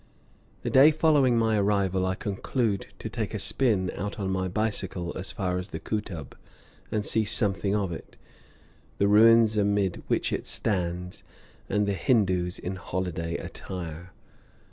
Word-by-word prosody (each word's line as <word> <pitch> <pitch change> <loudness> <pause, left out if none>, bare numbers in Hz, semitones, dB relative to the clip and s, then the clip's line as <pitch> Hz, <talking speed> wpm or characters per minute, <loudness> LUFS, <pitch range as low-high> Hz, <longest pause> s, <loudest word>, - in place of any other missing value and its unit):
The - - -2
day 135 +4 +8
following 150 -6 +3
my 110 -2 +2
arrival 95 -2 +1
I 95 - 0
conclude 105 +2 -2
to - - -6
take - - -4
a - - 0
spin 105 -9 +1
out 105 +5 -5
on 95 -2 -2
my 95 0 -1
bicycle 95 -4 -2
as 95 - -3
far 90 -5 -2
as 90 - -5
the - - -6
Kootub, 95 -9 -5 0.6
and 105 -1 -1
see 110 - +2
something 100 -2 +1
of 100 -4 -1
it, 80 - -9 0.8
the 100 - +3
ruins 110 +1 +6
amid 100 -3 +1
which - - 0
it - - -3
stands, 90 -3 -2 0.5
and 105 +1 +1
the 100 - 0
Hindoos 95 -3 +1
in 95 +2 -5
holiday 85 -2 -3
attire. 90 -1 -7
100 Hz, 150 wpm, -27 LUFS, 90-110 Hz, 0.8 s, day